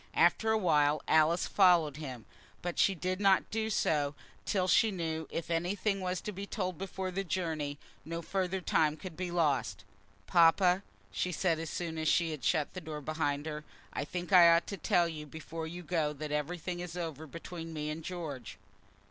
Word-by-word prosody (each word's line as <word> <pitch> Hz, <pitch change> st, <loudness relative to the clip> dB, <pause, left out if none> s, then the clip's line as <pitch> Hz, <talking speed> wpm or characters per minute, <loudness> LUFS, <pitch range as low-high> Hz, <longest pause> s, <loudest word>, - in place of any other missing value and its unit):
After 175 Hz, +6 st, +4 dB
a 220 Hz, -, +3 dB
while 150 Hz, -6 st, +3 dB
Alice 160 Hz, +2 st, +4 dB
followed 170 Hz, -7 st, +4 dB
him, 130 Hz, -7 st, -7 dB, 0.4 s
but 175 Hz, 0 st, -3 dB
she 195 Hz, -, +4 dB
did 185 Hz, +2 st, -2 dB
not 195 Hz, -1 st, +4 dB
do 220 Hz, 0 st, -1 dB
so 150 Hz, -8 st, +1 dB, 0.3 s
till 185 Hz, -2 st, +1 dB
she 220 Hz, +4 st, +5 dB
knew 160 Hz, -4 st, -3 dB
that -, -, -6 dB
if 170 Hz, 0 st, -4 dB
anything 195 Hz, +4 st, 0 dB
was 180 Hz, -1 st, -2 dB
to 210 Hz, -, -4 dB
be 200 Hz, +1 st, -6 dB
told 185 Hz, -6 st, -3 dB
before 190 Hz, -1 st, -4 dB
the 195 Hz, +2 st, -2 dB
journey 160 Hz, -5 st, -2 dB, 0.3 s
no 165 Hz, +1 st, -5 dB
further 190 Hz, +1 st, -1 dB
time 155 Hz, -3 st, +2 dB
could 185 Hz, -2 st, -8 dB
be 180 Hz, +1 st, -3 dB
lost. 140 Hz, -, 0 dB, 0.4 s
"Papa," 180 Hz, +2 st, +5 dB, 0.3 s
she 180 Hz, -, -1 dB
said, 165 Hz, -2 st, +1 dB
as 165 Hz, -1 st, -4 dB
soon 165 Hz, -1 st, -4 dB
as 160 Hz, -, -1 dB
she 165 Hz, +1 st, +3 dB
had 150 Hz, -3 st, -6 dB
shut 155 Hz, -4 st, +1 dB
the 185 Hz, -, -6 dB
door 155 Hz, -2 st, -6 dB
behind 145 Hz, -1 st, -1 dB
her, 150 Hz, -1 st, -5 dB, 0.3 s
"I -, -, -2 dB
think 175 Hz, +5 st, -5 dB
I 175 Hz, -2 st, +9 dB
ought 170 Hz, 0 st, +4 dB
to 200 Hz, -, -4 dB
tell 175 Hz, +1 st, +2 dB
you 155 Hz, -2 st, -6 dB
before 160 Hz, +2 st, -6 dB
you 175 Hz, +2 st, -7 dB
go 160 Hz, -3 st, 0 dB
that 150 Hz, +1 st, -6 dB
everything 175 Hz, +4 st, -3 dB
is 175 Hz, 0 st, -6 dB
over 160 Hz, -3 st, -5 dB
between 165 Hz, +2 st, -7 dB
me 150 Hz, -1 st, -3 dB
and 160 Hz, +1 st, -6 dB
George." 160 Hz, -8 st, -6 dB
165 Hz, 195 wpm, -32 LUFS, 155-180 Hz, 0.4 s, I